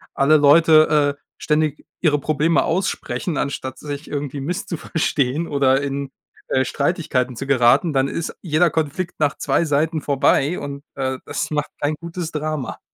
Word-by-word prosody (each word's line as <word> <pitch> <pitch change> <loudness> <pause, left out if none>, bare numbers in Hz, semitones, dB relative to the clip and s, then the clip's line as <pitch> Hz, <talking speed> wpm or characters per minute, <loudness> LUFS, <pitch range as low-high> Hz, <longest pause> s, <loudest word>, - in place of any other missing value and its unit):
alle 145 +3 +5
Leute, 150 -1 +5
äh, - - -39 0.2
ständig 150 -1 0 0.2
ihre 150 -4 +3
Probleme 155 +3 +1
aussprechen, 175 -2 -2
anstatt 130 -2 -3
sich 145 +1 -7
irgendwie 145 -1 -4
misszuverstehen 160 -3 -1
oder 135 -2 +2
in, 140 -1 -3 0.4
äh, 130 0 +2
Streitigkeiten 140 -5 -1
zu 135 - -5
geraten, 140 +5 +4
dann 135 0 +2
ist 165 +3 -4
jeder 170 0 +2
Konflikt 160 +3 -3
nach 150 -1 +1
2 170 - +1
Seiten 155 +1 0
vorbei 140 +3 +2
und, 140 0 -7
äh, 130 -1 -2
das - - -3
macht 150 -1 -1
kein 145 +1 0
gutes 170 0 -5
Drama. 155 -3 -4
150 Hz, 150 wpm, -21 LUFS, 140-160 Hz, 0.4 s, alle